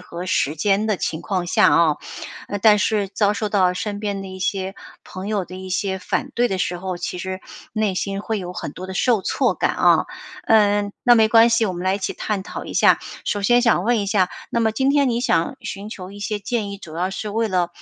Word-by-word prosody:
和 180 Hz, 0 st, -7 dB
时 155 Hz, -4 st, 0 dB
间 200 Hz, +5 st, +1 dB
的 215 Hz, -3 st, +1 dB
情 160 Hz, 0 st, -3 dB
况 180 Hz, -1 st, -2 dB
下 -, -, +4 dB
啊。 160 Hz, -3 st, +4 dB, 0.5 s
呃， 205 Hz, -, -3 dB
但 210 Hz, 0 st, +5 dB
是 205 Hz, 0 st, +1 dB
遭 205 Hz, +1 st, +1 dB
受 210 Hz, 0 st, -2 dB
到 185 Hz, -3 st, +3 dB
身 205 Hz, +3 st, -4 dB
边 200 Hz, -2 st, -3 dB
的 195 Hz, -, -8 dB
一 190 Hz, -, -8 dB
些 190 Hz, 0 st, -2 dB, 0.3 s
朋 190 Hz, +2 st, -7 dB
友 205 Hz, -3 st, -1 dB
的 185 Hz, -, -11 dB
一 190 Hz, 0 st, -8 dB
些 190 Hz, +1 st, -1 dB
反 270 Hz, +8 st, -2 dB
对 240 Hz, +1 st, +2 dB
的 190 Hz, -, -1 dB
时 180 Hz, -1 st, -2 dB
候， 185 Hz, -1 st, -4 dB
其 180 Hz, -, -4 dB
实 185 Hz, +1 st, -5 dB, 0.3 s
内 215 Hz, -3 st, 0 dB
心 195 Hz, +2 st, -3 dB
会 220 Hz, 0 st, -2 dB
有 180 Hz, -1 st, -6 dB
很 -, -, -5 dB
多 185 Hz, -, -8 dB
的 190 Hz, -, -7 dB
受 230 Hz, 0 st, +2 dB
挫 -, -, +1 dB
感 -, -, 0 dB
啊。 -, -, +4 dB, 0.4 s
嗯， 205 Hz, -2 st, +3 dB
那 245 Hz, -3 st, +6 dB
没 220 Hz, -2 st, +5 dB
关 230 Hz, +1 st, +6 dB
系， 225 Hz, -1 st, +3 dB
我 185 Hz, -, -3 dB
们 175 Hz, -, -5 dB
来 190 Hz, -, +2 dB
一 200 Hz, -, -2 dB
起 190 Hz, -, -3 dB
探 205 Hz, -3 st, -2 dB
讨 -, -, -7 dB
一 -, -, -7 dB
下。 -, -, +5 dB, 0.3 s
首 205 Hz, -1 st, -1 dB
先 240 Hz, +4 st, +4 dB
想 225 Hz, -6 st, +2 dB
问 235 Hz, -1 st, +2 dB
一 200 Hz, -, -2 dB
下， 195 Hz, -3 st, +2 dB, 0.2 s
那 235 Hz, -, 0 dB
么 220 Hz, -1 st, +2 dB
今 265 Hz, +5 st, +1 dB
天 280 Hz, -2 st, +3 dB
你 235 Hz, +1 st, 0 dB
想 170 Hz, -9 st, +1 dB
寻 205 Hz, +2 st, -6 dB
求 185 Hz, -3 st, -8 dB
一 200 Hz, -, -11 dB
些 205 Hz, +1 st, -3 dB
建 205 Hz, 0 st, -2 dB
议， 200 Hz, -, -7 dB
主 170 Hz, -5 st, -11 dB
要 185 Hz, +2 st, -1 dB
是 210 Hz, +2 st, -5 dB
为 225 Hz, +1 st, 0 dB
了， 180 Hz, -2 st, +1 dB
200 Hz, 265 characters per minute, -21 LUFS, 185-215 Hz, 0.5 s, 那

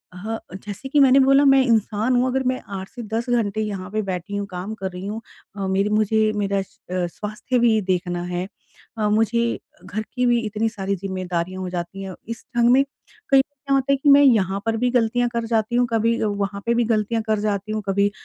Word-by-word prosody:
ह 220 Hz, +5 st, -4 dB, 0.2 s
जैसे 205 Hz, +6 st, -7 dB
कि 290 Hz, -, +3 dB
मैंने 270 Hz, -1 st, +6 dB
बोला, 275 Hz, +1 st, +5 dB
मैं 270 Hz, -1 st, +6 dB
इंसान 225 Hz, +1 st, +1 dB
हूँ। 245 Hz, +1 st, +3 dB
अगर 265 Hz, +1 st, 0 dB
मैं 255 Hz, 0 st, 0 dB, 0.2 s
8 190 Hz, 0 st, -6 dB
से 245 Hz, -, -9 dB
10 235 Hz, +2 st, -1 dB
घंटे 220 Hz, -3 st, +1 dB
यहाँ 200 Hz, -3 st, -4 dB
पे 215 Hz, +1 st, 0 dB
बैठी 190 Hz, 0 st, -4 dB
हूँ, 205 Hz, 0 st, -2 dB
काम 185 Hz, +3 st, -5 dB
कर 190 Hz, -1 st, -2 dB
रही 180 Hz, +1 st, -7 dB
हूँ 215 Hz, +3 st, -4 dB, 0.4 s
अ, 195 Hz, -1 st, -2 dB
मेरी 195 Hz, +2 st, +1 dB
मुझे 215 Hz, 0 st, +2 dB
मेरा 200 Hz, -1 st, 0 dB
अ, -, -, 0 dB, 0.5 s
स्वास्थ्य 215 Hz, -, -3 dB
भी 230 Hz, -2 st, +4 dB
देखना 180 Hz, -2 st, -1 dB
है। 180 Hz, +1 st, -3 dB, 0.5 s
अ, 215 Hz, -1 st, +1 dB
मुझे 225 Hz, +2 st, +1 dB, 0.3 s
घर 215 Hz, -, -3 dB
की 250 Hz, 0 st, 0 dB
भी 240 Hz, -1 st, +3 dB
इतनी 215 Hz, +1 st, -1 dB
सारी 200 Hz, -3 st, -3 dB
ज़िम्मेदारियाँ 185 Hz, -1 st, -3 dB
हो 185 Hz, -, -3 dB
जाती 180 Hz, +2 st, -5 dB
हैं, 190 Hz, -1 st, -6 dB
इस 230 Hz, 0 st, -7 dB
ढंग 235 Hz, 0 st, +5 dB
में 265 Hz, +2 st, +6 dB, 0.5 s
कई 275 Hz, -, +6 dB
बार -, -, +8 dB, 0.2 s
क्या 275 Hz, -, +1 dB
होता 270 Hz, 0 st, +1 dB
है -, -, +5 dB
कि 285 Hz, +2 st, +2 dB
मैं 280 Hz, 0 st, +8 dB
यहाँ 200 Hz, -7 st, +3 dB
पर 225 Hz, 0 st, 0 dB
भी 250 Hz, +2 st, +1 dB
गलतियाँ 245 Hz, 0 st, +2 dB
कर 235 Hz, -1 st, -1 dB
जाती 225 Hz, 0 st, 0 dB
हूँ, 245 Hz, 0 st, +4 dB
कभी 230 Hz, +1 st, +2 dB
वहाँ 200 Hz, -1 st, -2 dB
पे 235 Hz, -, +2 dB
भी 240 Hz, 0 st, +2 dB
गलतियाँ 220 Hz, +1 st, 0 dB
कर 215 Hz, -1 st, +1 dB
जाती 205 Hz, 0 st, -2 dB
हूँ, 215 Hz, 0 st, -2 dB
कभी 200 Hz, +1 st, +2 dB
215 Hz, 225 wpm, -22 LUFS, 195-240 Hz, 0.5 s, बार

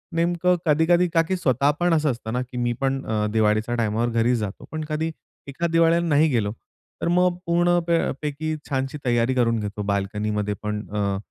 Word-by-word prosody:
नेमकं 175 Hz, +1 st, +2 dB
कधी-कधी 165 Hz, +4 st, +3 dB
का 165 Hz, -, +5 dB
की 190 Hz, -, 0 dB
स्वतः 140 Hz, -3 st, +2 dB
पण 175 Hz, -1 st, +2 dB
असं 155 Hz, -3 st, +2 dB
असतं 115 Hz, -1 st, -6 dB
ना 125 Hz, -, 0 dB
की 125 Hz, 0 st, -8 dB
मी 120 Hz, 0 st, 0 dB
पण 135 Hz, 0 st, 0 dB
अ, 110 Hz, -1 st, 0 dB
दिवाळीच्या 110 Hz, +2 st, +2 dB
टाईमवर 115 Hz, +1 st, 0 dB
घरीच 115 Hz, +1 st, +2 dB
जातो. 105 Hz, -2 st, -5 dB
पण 155 Hz, -1 st, -4 dB
कधी 160 Hz, +2 st, -1 dB, 0.4 s
एखाद 165 Hz, +5 st, -2 dB
दिवाळीला 165 Hz, 0 st, +4 dB
नाही 155 Hz, +1 st, +4 dB
गेलो, 110 Hz, -5 st, 0 dB, 0.5 s
तर -, -, -1 dB
मग 180 Hz, 0 st, +2 dB
पूर्ण 175 Hz, +1 st, +3 dB
प -, -, 0 dB, 0.3 s
पैकी 155 Hz, +1 st, -3 dB
छानशी 135 Hz, +1 st, -2 dB
तैय्यारी 120 Hz, +1 st, +2 dB
करून 115 Hz, -2 st, +2 dB
घेतो. 105 Hz, 0 st, -4 dB
बाल्कनीमध्ये 105 Hz, +1 st, -1 dB
पण 105 Hz, 0 st, -3 dB
अ, 100 Hz, -2 st, -1 dB
130 Hz, 185 wpm, -23 LUFS, 110-165 Hz, 0.5 s, का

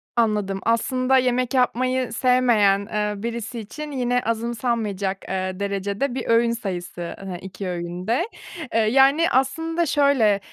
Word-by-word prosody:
Anladım. 210 Hz, -4 st, +1 dB
Aslında 255 Hz, +3 st, +2 dB
yemek 250 Hz, 0 st, +1 dB
yapmayı 255 Hz, 0 st, +1 dB
sevmeyen, 240 Hz, -6 st, +3 dB
eee, 210 Hz, 0 st, 0 dB
birisi 235 Hz, 0 st, -4 dB
için 295 Hz, +8 st, -7 dB
yine 245 Hz, -2 st, 0 dB
azımsanmaya 230 Hz, -2 st, -1 dB
cak, 195 Hz, 0 st, -2 dB
eee, 185 Hz, 0 st, -3 dB
derecede 200 Hz, +6 st, -2 dB
bir 255 Hz, -, -3 dB
öğün 230 Hz, 0 st, +4 dB
sayısı, 180 Hz, -6 st, -5 dB
hani, 190 Hz, -2 st, -6 dB
2 190 Hz, 0 st, -7 dB
öğün 175 Hz, +1 st, -5 dB
de. 260 Hz, -, +1 dB, 0.5 s
Eee, 225 Hz, -, +3 dB
yani 270 Hz, +8 st, +4 dB
aslında 325 Hz, +6 st, +1 dB
şöyle, 280 Hz, -4 st, +3 dB
ııı, 200 Hz, -, 0 dB
230 Hz, 140 wpm, -23 LUFS, 200-255 Hz, 0.5 s, öğün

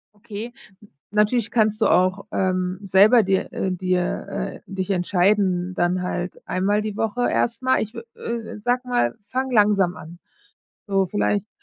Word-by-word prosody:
Okay. 225 Hz, +2 st, -8 dB, 0.6 s
Natürlich 210 Hz, +2 st, +1 dB
kannst 215 Hz, -1 st, +1 dB
du -, -, +4 dB
auch, 185 Hz, +3 st, +2 dB
ähm, 185 Hz, 0 st, -1 dB
selber 205 Hz, +5 st, +6 dB
dir 190 Hz, -1 st, 0 dB
äh, 190 Hz, -, -2 dB
dir 185 Hz, -1 st, -1 dB
äh, 60 Hz, -, -5 dB
dich 190 Hz, 0 st, -4 dB
entscheiden. 185 Hz, 0 st, +1 dB
Dann 180 Hz, +1 st, 0 dB
halt 180 Hz, 0 st, -4 dB
einmal 205 Hz, +3 st, +1 dB
die 215 Hz, -1 st, -4 dB
Woche 225 Hz, +2 st, 0 dB
erstmal, 255 Hz, +2 st, +1 dB
ich 220 Hz, +2 st, -4 dB
wü 230 Hz, -, -7 dB
äh, 230 Hz, -2 st, -5 dB
sag 245 Hz, +3 st, 0 dB
mal, 180 Hz, -, 0 dB
fang 260 Hz, +1 st, -2 dB
langsam 205 Hz, -6 st, +3 dB
an. 170 Hz, +3 st, -11 dB, 0.7 s
So 195 Hz, -1 st, +2 dB
vielleicht, 205 Hz, +2 st, -1 dB
200 Hz, 150 wpm, -22 LUFS, 185-220 Hz, 0.7 s, selber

